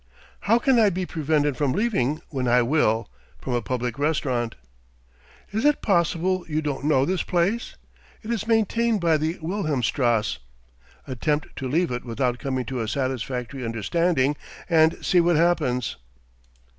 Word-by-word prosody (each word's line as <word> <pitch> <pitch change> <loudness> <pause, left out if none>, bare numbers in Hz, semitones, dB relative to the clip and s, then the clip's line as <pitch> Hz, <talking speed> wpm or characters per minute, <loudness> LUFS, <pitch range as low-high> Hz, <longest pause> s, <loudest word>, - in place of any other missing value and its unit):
"How 230 - +6
can 255 0 +3
I 215 -2 +5
be 185 0 -2
prevented 150 -4 0
from 135 -2 +1
leaving 155 - 0
when 130 -4 -2
I 120 +1 +4
will, 115 -4 +1 0.3
from 130 - -4
a 120 - +1
public 125 +1 -3
restaurant?" 130 -6 0 1.0
"Is 220 +2 -1
it 295 0 +2
possible 180 0 +1
you 155 0 0
don't 145 -2 -3
know 135 -3 +3
this 185 +2 0
place? 190 +7 -1 0.5
It 220 - -4
is 220 -2 -2
maintained 225 0 +2
by 165 -3 +3
the 155 +3 -2
Wilhelmstrasse. 130 - 0 0.7
Attempt 145 +3 -2
to 130 - -4
leave 165 +2 +1
it 120 0 -3
without 125 +1 -1
coming 130 -2 -2
to 130 -3 -3
a 110 - -3
satisfactory 130 +1 -3
understanding, 135 - +1 0.3
and 160 -2 +3
see 180 - +4
what 170 0 +3
happens." 150 -7 +1
150 Hz, 150 wpm, -24 LUFS, 125-175 Hz, 1.0 s, How